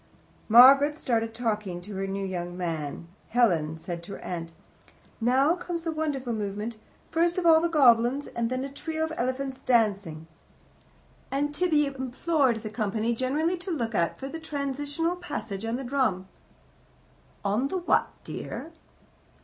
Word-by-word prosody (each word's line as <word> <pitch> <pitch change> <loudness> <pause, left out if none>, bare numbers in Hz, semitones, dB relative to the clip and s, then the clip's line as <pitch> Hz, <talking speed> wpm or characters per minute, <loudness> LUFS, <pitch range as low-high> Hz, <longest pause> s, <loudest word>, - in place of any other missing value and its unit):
Margaret 275 +6 +8
started 225 -5 0
talking 215 -6 -2
to 205 +3 -9
her 195 0 -2
new 195 0 -3
young 175 -1 -4
man; 165 -2 -4 0.2
Helen 170 -10 +2
said 170 +1 -6
to 180 +4 -9
her - - -8
aunt: 165 -2 -5 0.7
"Now 265 +7 +4
comes 350 -2 -5
the 330 - -1
wonderful 290 -6 -2
movement: 210 +1 -4 0.3
first 340 +2 +2
of 365 - -1
all 320 -1 +7
the 340 - +1
goblins, 260 -2 +4
and 235 -1 -2
then 255 +1 -2
a 275 - -4
trio 315 +2 -3
of 320 0 -2
elephants 260 +1 -2
dancing;" 200 -10 +1 1.0
and 290 +2 -1
Tibby 305 -2 +2
implored 265 -2 0
the 215 - -5
company 220 +1 -1
generally 295 +9 0
to 360 - -5
look 235 -9 -2
out 170 -4 0
for 270 - -6
the 325 +4 -6
transitional 290 +3 -2
passage 225 - -5
on 225 +1 -1
the 265 - -4
drum. 240 -8 0 1.2
"On 210 +7 +1
the 375 - -2
what, 350 - +2 0.2
dear?" 330 - -6
250 Hz, 155 wpm, -27 LUFS, 210-295 Hz, 1.2 s, Margaret